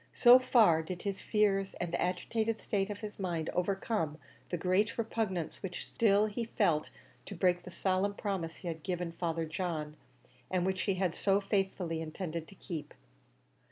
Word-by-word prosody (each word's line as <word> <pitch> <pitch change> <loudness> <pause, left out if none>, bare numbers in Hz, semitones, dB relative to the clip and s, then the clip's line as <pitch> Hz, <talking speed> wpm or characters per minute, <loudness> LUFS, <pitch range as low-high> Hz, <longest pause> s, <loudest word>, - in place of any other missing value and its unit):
So 245 +1 +8
far 220 -10 +5
did 175 +2 -6
his 195 -1 -3
fears 195 -2 +1
and 175 -1 -4
the - - 0
agitated 220 +5 0
state 195 -1 -1
of 205 0 -5
his 210 -1 -7
mind 170 -4 -2
overcome 180 -3 -1 0.3
the 175 - -1
great 190 +6 +1
repugnance 215 -7 -2
which 185 -2 -5
still 210 -2 +3
he 215 +2 -3
felt 180 -10 +1 0.4
to 200 - -6
break 180 0 +2
the 180 - -10
solemn 190 +2 0
promise 185 -6 -3
he 180 - -9
had 165 -1 -4
given 175 -1 -2
Father 165 -1 -2
John, 160 -2 -3 0.5
and 180 -1 +1
which 190 0 0
he 195 - +3
had 185 -3 0
so 195 0 +2
faithfully 190 -5 -1
intended 160 0 -4
to 195 - -14
keep. 165 -5 -7
185 Hz, 170 wpm, -32 LUFS, 170-205 Hz, 0.5 s, So